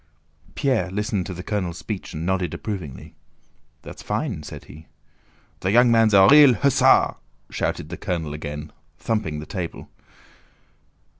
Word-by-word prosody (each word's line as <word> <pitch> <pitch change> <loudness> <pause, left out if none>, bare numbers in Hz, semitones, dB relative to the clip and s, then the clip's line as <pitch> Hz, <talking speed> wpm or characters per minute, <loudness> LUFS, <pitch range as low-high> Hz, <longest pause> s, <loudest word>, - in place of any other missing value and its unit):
Pierre 130 - 0
listened 100 -1 -2
to 95 - -5
the 90 - -7
colonel's 90 -5 -3
speech 95 -1 -6
and 80 +2 -4
nodded 95 -1 -1
approvingly. 80 - -7 0.7
"That's - - -10
fine," 105 - -3
said 75 -1 -10
he. 80 +3 -14 0.7
"The 95 - -2
young 120 +3 +5
man's 115 -2 +4
a 95 -1 +7
real 145 -3 +8
hussar!" 140 +4 +3 0.3
shouted - - -3
the - - -6
colonel, 80 -5 -3
again 75 0 -7 0.3
thumping 95 -9 -2
the 75 - -7
table. 90 0 -6
95 Hz, 140 wpm, -23 LUFS, 80-110 Hz, 0.7 s, real